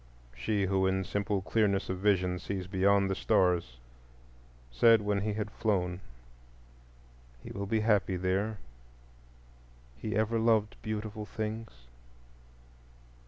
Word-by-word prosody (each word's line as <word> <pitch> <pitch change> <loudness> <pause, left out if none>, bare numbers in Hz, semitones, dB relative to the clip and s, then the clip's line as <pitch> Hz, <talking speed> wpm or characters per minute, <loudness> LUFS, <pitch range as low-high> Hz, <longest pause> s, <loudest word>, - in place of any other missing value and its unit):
She 100 - 0
who 95 0 +2
in 95 0 0
simple 100 0 -2
clearness 100 -1 +1
of 95 -1 -3
vision 95 -3 +1
sees 95 +1 -4
beyond 100 +1 +2
the 95 - 0
stars 90 -9 +1 0.9
said 115 - +6
when 100 -1 0
he 105 +1 -1
had 105 0 -3
flown, 95 -5 -1 1.4
"He - - -8
will 100 0 -4
be 110 +1 +1
happy 105 -3 +2
There; 95 +4 -1 1.4
he 105 - -4
ever 110 +1 +1
loved 110 -2 +2
beautiful 110 0 -5
things." 110 +2 -4
100 Hz, 120 wpm, -30 LUFS, 95-110 Hz, 1.4 s, said